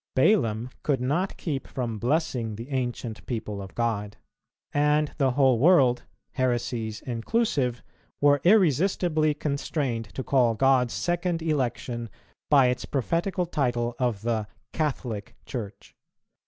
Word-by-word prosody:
Balaam 125 - +2
could 140 -4 +1
not 150 +10 -1
keep 145 -6 -3
from 120 -5 -4
blessing 125 -5 0
the 115 +6 -8
ancient 120 -3 -3
people 110 -4 -4
of 95 - -10
God; 105 -3 -2 0.6
and 150 +1 +2
the 135 -2 +4
whole 130 -3 +4
world, 135 -5 +4 0.3
heresies 120 -3 -1
inclusive, 125 - -1 0.4
were 145 -1 +4
irresistibly 170 - +3
constrained 140 -5 -2
to 130 - -3
call 125 -4 +3
God's 130 0 +3
second 175 -1 -1
election 125 -6 -2 0.4
by 140 -3 +6
its 125 0 -2
prophetical 170 - -1
title 120 -7 -1
of 120 -5 -1
the 110 -3 -1 0.3
"Catholic" 120 -7 -3
Church. 110 -6 -7
130 Hz, 120 wpm, -26 LUFS, 120-150 Hz, 0.6 s, by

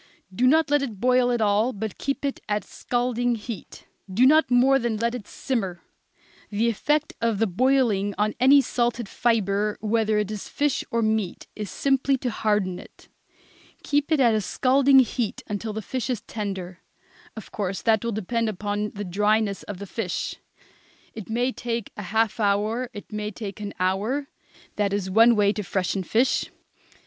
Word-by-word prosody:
Do 250 +7 +2
not 315 +2 +3
let 290 -1 +4
it 230 -8 -5
boil 250 +1 +3
at 240 -2 0
all, 215 +4 +2
but 215 0 -5
keep 275 0 -2
it 275 - -2
at 210 0 0
a - - -25
scalding 245 0 -1
heat. 215 -4 -8 0.3
Do 230 +7 +4
not 310 +4 +5
more 260 +2 +4
than 235 -3 -1
let 235 +2 0
it 240 -5 -6
simmer. 195 -10 -3 0.7
The 220 +3 +1
effect 295 +7 0
of 230 -2 +1
the 225 - +2
boiling 215 -2 +1
on 210 +1 +1
any 275 +3 +7
salted 240 -3 -1
fibre, 210 -2 0
whether 215 0 +1
it 210 0 -1
is 210 -2 -6
fish 290 -2 0
or 230 0 0
meat, 215 -4 -1
is 210 -2 -5
simply 270 +5 +1
to 250 -1 -3
harden 205 -5 0
it. - - -16 0.7
Keep 290 +2 0
it 310 - +3
at 240 -4 +5
a 215 - +1
scalding 270 +5 +4
heat 235 -2 -2
until 210 +2 -4
the 215 0 -5
fish 260 +3 -3
is 240 -5 -1
tender. 190 -5 -5 0.6
Of 220 - -10
course 190 -5 -3
that 220 -1 +3
will 235 - -1
depend 225 +2 -1
upon 205 +1 -3
the 205 0 -4
dryness 205 +2 +1
of 205 - -7
the 200 - -7
fish. 200 -2 -3 0.8
It 220 -2 -9
may 245 +3 0
take 235 -3 -4
a - - -6
half 225 +1 +1
hour, 215 +4 +1
it 205 -2 -10
may 210 0 -3
take 210 -1 -7
an 205 -1 -6
hour. 210 +10 0 0.5
That 200 -1 +1
is 190 -2 -2
one 230 +4 +6
way 205 -1 +3
to 210 - -3
freshen 190 0 -1
fish. 230 +8 +1
220 Hz, 180 wpm, -25 LUFS, 205-245 Hz, 0.8 s, any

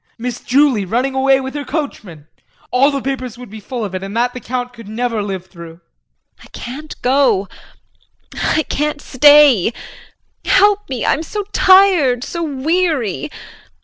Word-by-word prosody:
Miss 245 +1 -5
Julie 265 -5 +2
running 245 +8 -1
away 265 0 +3
with 265 0 -6
her 290 -1 -4
coachman? 215 - -6 0.5
All 265 +3 +4
the 275 -2 -3
papers 255 -3 -4
would 245 -4 -11
be 220 - -9
full 235 +1 -5
of 195 - -7
it 185 - -4
and 195 +3 -6
that 245 +1 +1
the 250 - -7
Count 245 0 -4
could 230 -3 -12
never 230 0 -2
live 190 -3 -5
through. 170 -3 -12
JULIE. 170 0 -31
I - - -15
can't 295 +6 -8
go 255 -7 +2 0.9
I 310 - 0
can't 300 +1 -2
stay. 285 -6 +5 0.7
Help 410 -1 +3
me, 255 -3 -3
I'm 305 - +1
so 410 +6 -5
tired 365 -11 +4
so 340 +3 -5
weary. 305 - -1
255 Hz, 160 wpm, -17 LUFS, 225-295 Hz, 0.9 s, stay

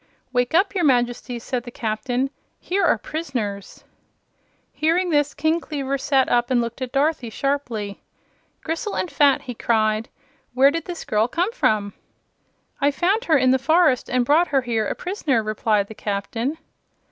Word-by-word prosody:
"Wake 245 +4 +1
up, 385 +4 +3
your 370 -3 0
Majesty," 245 -2 +1
said 245 +1 -3
the 240 - -9
Captain. 245 +4 -2 0.3
"Here 385 +2 -1
are 345 - +4
prisoners." 225 - -5 0.9
Hearing 340 +3 +1
this, 290 -2 +1
King 315 +3 +1
Kleaver 275 -4 -3
sat 265 -1 +2
up 240 0 +1
and 255 -2 +3
looked 235 +2 -4
at 255 -1 -3
Dorothy 275 -3 0
sharply. 230 -6 -3 0.6
"Gristle 330 +6 -3
and 360 - -2
fat!" 280 -2 +3
he 250 - -6
cried. 220 -1 0 0.5
"Where 270 +2 +6
did 330 +1 -3
this 355 -2 -6
girl 215 +2 +1
come 350 - -1
from?" 210 - 0 0.9
"I 285 - +4
found 375 - 0
her 315 -3 +4
in 255 -1 +3
the 260 - +3
forest 315 -2 +3
and 250 -1 +1
brought 315 +7 +4
her 275 -3 +2
here 225 -4 -1
a - - -2
prisoner," 305 - -1
replied 215 -1 +1
the 220 - -10
Captain. 220 +7 -3
260 Hz, 165 wpm, -22 LUFS, 230-315 Hz, 0.9 s, Where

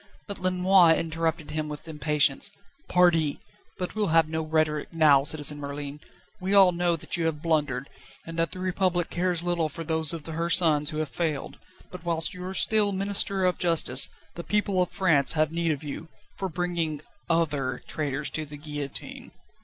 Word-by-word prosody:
But 200 -2 -4
Lenoir 185 -2 +4
interrupted 160 -1 -2
him 155 0 -3
with 150 +2 -8
impatience. 150 0 +1 0.4
"_Pardi!_but 175 0 0
we'll 215 -1 -1
have 165 -1 +3
no 160 0 -3
rhetoric 155 -1 -1
now, 150 -4 +5
Citizen 150 0 +2
Merlin. 145 0 -6 0.4
We 190 +2 0
all 190 -2 +7
know 175 0 +1
that 165 - -3
you 165 - -1
have 150 -2 -4
blundered, 145 -5 0 0.4
and 165 - -8
that 165 - 0
the - - -8
Republic 185 -1 -1
cares 175 -1 0
little 175 -3 0
for 165 +3 -6
those 160 -1 +1
of 165 -3 -5
her 165 +1 -3
sons 155 -4 +4
who 155 - -6
have 155 -2 -2
failed, 155 -2 -3 0.3
but 180 -2 -9
whilst 165 -2 0
you 180 0 -8
are 190 - -4
still 210 0 +3
Minister 195 0 +1
of 180 - +1
Justice 165 -7 +4 0.2
the 170 - -7
people 205 -2 0
of 180 - 0
France 160 -8 +2
have 155 -1 +1
need 170 0 -1
of 150 -1 -4
you 150 +2 -7 0.3
for 190 - -3
bringing 165 -3 -3 0.3
other 145 -6 0
traitors 150 -1 -2
to 155 - -2
the 150 0 -9
guillotine." 145 -2 -7
165 Hz, 175 wpm, -26 LUFS, 150-180 Hz, 0.4 s, all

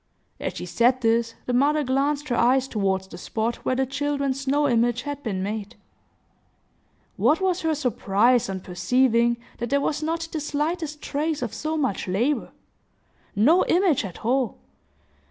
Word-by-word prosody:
As - - -4
she - - -5
said 250 +2 +2
this, 230 0 +1
the 250 - -2
mother 295 +4 +3
glanced 280 +2 0
her 240 - +1
eyes 255 +3 +3
toward 195 -5 0
the 190 - -11
spot 225 +5 -2
where 255 - -1
the 265 +1 +1
children's 280 0 -2
snow 285 +2 +1
image 240 0 +1
had 285 0 -5
been 195 -8 -3
made. 210 +2 -4 1.4
What 310 - +3
was 375 -2 0
her 320 -1 +1
surprise, 240 -3 +2
on 190 -1 -4
perceiving 235 +6 +2 0.2
that 240 -1 -3
there 280 - +2
was 290 +1 -1
not 330 +1 -2
the 315 - -2
slightest 300 +1 -3
trace 300 0 -2
of 235 - -4
so 315 +1 -3
much 265 -12 -1
labor!—no 245 - -1
image 350 -7 +3
at 195 +1 -8
all! 255 +1 +1
260 Hz, 155 wpm, -24 LUFS, 230-295 Hz, 1.4 s, mother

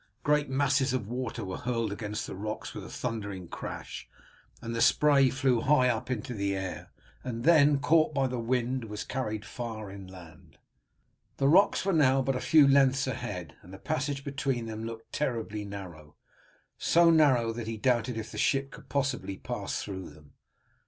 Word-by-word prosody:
Great 150 -1 +2
masses 135 0 +2
of 120 -6 -2
water 120 -2 -4
were 95 - -5
hurled 115 -3 -1
against 105 +1 -4
the - - -7
rocks 105 +3 -5
with - - -7
a - - -9
thundering 100 -6 -5
crash, - - -7 0.5
and 115 - -5
the 115 - -1
spray 140 +1 +5
flew 130 -3 +1
high 130 -1 +4
up 115 +1 -2
into 125 -1 -3
the 100 -2 -1
air, 95 -1 -5 0.3
and 115 -2 -4
then, 150 -3 +6
caught 155 +3 +3
by 140 -3 +1
the 125 -1 -2
wind, 125 +1 -1
was 105 -1 -5
carried 110 -5 -4
far 110 -4 -6
inland. 90 -5 -12 0.8
The 135 - +2
rocks 190 +5 +4
were 195 - +2
now 135 -4 +4
but 135 0 0
a - - -1
few 155 -3 +6
lengths 135 0 +4
ahead, 105 -9 -5
and 90 - -15
the 95 - -9
passage 145 +1 -2
between 135 -4 -2
them 110 0 -5
looked 115 0 -8
terribly 110 -6 -2
narrow, 85 -7 -9 0.6
so 170 0 +5
narrow 130 -8 +4
that 115 -1 -6
he 115 0 -4
doubted 120 0 +1
if 110 0 -5
the - - -6
ship 135 -1 +1
could - - -13
possibly 135 -8 -1
pass - - -4
through 95 -3 -6
them. 75 -1 -18
120 Hz, 180 wpm, -29 LUFS, 105-135 Hz, 0.8 s, then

